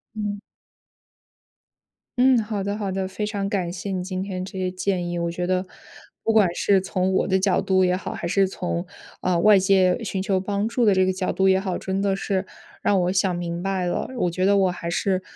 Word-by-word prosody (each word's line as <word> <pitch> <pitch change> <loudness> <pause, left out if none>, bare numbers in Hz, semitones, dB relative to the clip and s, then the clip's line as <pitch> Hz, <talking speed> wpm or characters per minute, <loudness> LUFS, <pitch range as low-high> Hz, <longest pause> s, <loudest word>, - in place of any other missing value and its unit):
嗯。 205 -1 -3 1.8
嗯， 260 0 +6
好 210 -2 -3
的 200 +1 -2
好 205 -2 -3
的。 190 0 -2
非 210 +3 -4
常 200 -2 -2
感 185 -4 -1
谢 195 +2 -5
你 185 -1 -2
今 185 0 -4
天 185 -2 -4
这 190 0 -8
些 185 -1 -1
建 185 -1 -1
议， 175 - -3
我 170 0 -1
觉 175 +1 -3
得， 185 0 0 0.6
不 225 - +2
管 205 -6 +4
是 195 +2 +2
从 185 0 -1
我 - - +1
的 190 - +3
角 190 0 +2
度 185 -1 +3
也 180 - +2
好， - - -6
还 - - -5
是 195 +2 +2
从， 175 -1 -3 0.4
啊， 180 -1 +1
外 210 +4 +6
界 190 +1 +3
寻 195 -3 -3
求 190 0 0
帮 200 +2 -1
助 230 +1 0
的 210 - +5
这 185 -1 +3
个 185 - +2
角 185 0 -2
度 190 +2 +2
也 190 0 +4
好， 190 -2 -3
真 190 +1 -2
的 195 -1 +1
是 195 -1 -1 0.4
让 195 -2 +3
我 180 +1 +1
想 185 -2 +1
明 170 0 -4
白 190 -2 -1
了。 175 - -2
我 180 - +1
觉 185 +2 -1
得 200 +1 +4
我 195 -1 +3
还 170 -1 -5
是， 185 +1 0
190 Hz, 240 characters per minute, -23 LUFS, 185-200 Hz, 1.8 s, 嗯